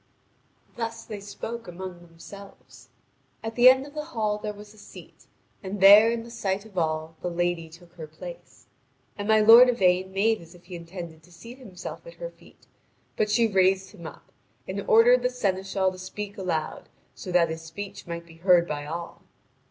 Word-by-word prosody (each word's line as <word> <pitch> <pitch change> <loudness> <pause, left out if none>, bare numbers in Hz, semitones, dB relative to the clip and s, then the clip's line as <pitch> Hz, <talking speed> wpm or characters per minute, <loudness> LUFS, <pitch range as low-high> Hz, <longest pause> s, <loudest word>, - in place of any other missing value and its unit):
Thus 230 -1 -5
they 215 -2 -7
spoke 225 +3 -7
among 180 0 -8
themselves. 165 -7 -14 0.5
At 225 0 -4
the 245 +2 +8
end 260 +1 +3
of 285 - -13
the 300 -1 -5
hall 210 -1 0
there 210 0 -4
was 210 0 -13
a 215 - -18
seat, - - -15 0.3
and 200 0 -6
there 205 +3 +9
in 230 0 -2
the 235 - -12
sight 200 -3 -3
of 215 -3 -16
all 160 -1 -2
the 180 - -2
lady 175 -1 -2
took 170 +1 -17
her 165 -3 -9
place. - - -12 0.5
And 205 0 -5
my 220 0 +5
lord 230 +4 +9
Yvain 185 -5 +2
made 215 +2 +1
as 170 +1 -15
if 175 - -19
he 180 0 -9
intended 170 -1 -9
to 180 - -22
seat 235 +9 -12
himself 210 - -9
at - - -11
her - - -7
feet; - - -21 0.5
but 210 - 0
she 230 +2 +3
raised 190 -1 +2
him 170 -6 -10
up, - - -14 0.4
and 195 +1 -4
ordered 240 +3 +6
the 250 - +1
seneschal 195 -5 -1
to 185 - -11
speak 200 +2 -7
aloud, 170 -5 -4 0.2
so 185 - -8
that 170 -2 +3
his 160 0 -6
speech 170 +5 -9
might 170 0 -6
be 165 -1 -16
heard 175 0 +4
by 145 -1 -4
all. 170 +2 -7
190 Hz, 190 wpm, -26 LUFS, 170-220 Hz, 0.5 s, there